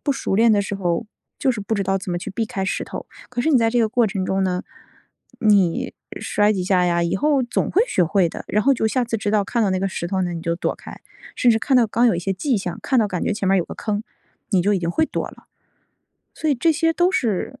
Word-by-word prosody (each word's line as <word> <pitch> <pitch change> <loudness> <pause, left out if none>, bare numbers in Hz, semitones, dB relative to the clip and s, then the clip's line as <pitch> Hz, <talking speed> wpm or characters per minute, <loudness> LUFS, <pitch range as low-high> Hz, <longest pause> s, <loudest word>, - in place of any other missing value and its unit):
不 285 - 0
熟 265 - -2
练 230 +3 +5
的 205 -2 +3
时 200 - -4
候， 180 +1 -1 0.3
就 270 - +2
是 215 - -5
不 210 +3 -2
知 200 - 0
道 195 0 0
怎 185 - -6
么 175 - -1
去 195 - -6
避 220 +3 -2
开 205 -5 -3
石 190 - -2
头。 - - -7 0.2
可 245 -1 -3
是 320 - +2
你 270 - +5
在 230 - +3
这 245 - +1
个 225 -2 +3
过 240 0 +3
程 195 -3 -2
中 190 +1 0
呢， 180 -1 -1 0.8
你 200 -6 +2 0.3
摔 210 +1 +2
几 190 -3 -2
下 180 -1 +2
呀， 170 0 +1
以 170 - 0
后 285 +5 +2
总 240 - -1
会 415 - +4
学 185 - +1
会 175 +1 +2
的， - - -8
然 210 +1 +1
后 275 - +4
就 225 -3 0
下 250 +3 +1
次 230 -1 -2
知 205 - -1
道 210 -1 +2
看 235 +2 0
到 200 - +2
那 185 - 0
个 195 - 0
石 170 - -4
头 190 +1 -1
呢， 175 -1 -2
你 165 - -5
就 170 0 -2
躲 - - -1
开， - - -12 0.4
甚 245 - +4
至 225 - +3
看 265 +3 +2
到 240 -3 +5
刚 235 +3 +2
有 230 - +3
一 - - -2
些 190 +3 -1
迹 250 +6 0
象， 185 -3 -4
看 260 - +1
到 220 - +3
感 185 -4 -3
觉 - - 0
前 200 - -3
面 195 0 +4
有 175 - 0
个 - - -8
坑， 210 -1 -3 0.5
你 185 -4 +3
就 205 +2 +2
已 195 - +2
经 170 -1 -2
会 315 - +2
躲 - - -3
了。 - - -16 0.9
所 315 - -2
以 - - +3
这 320 +6 +2
些 325 +1 +1
都 355 +3 +2
是 225 - -1
205 Hz, 305 characters per minute, -21 LUFS, 185-240 Hz, 0.9 s, 练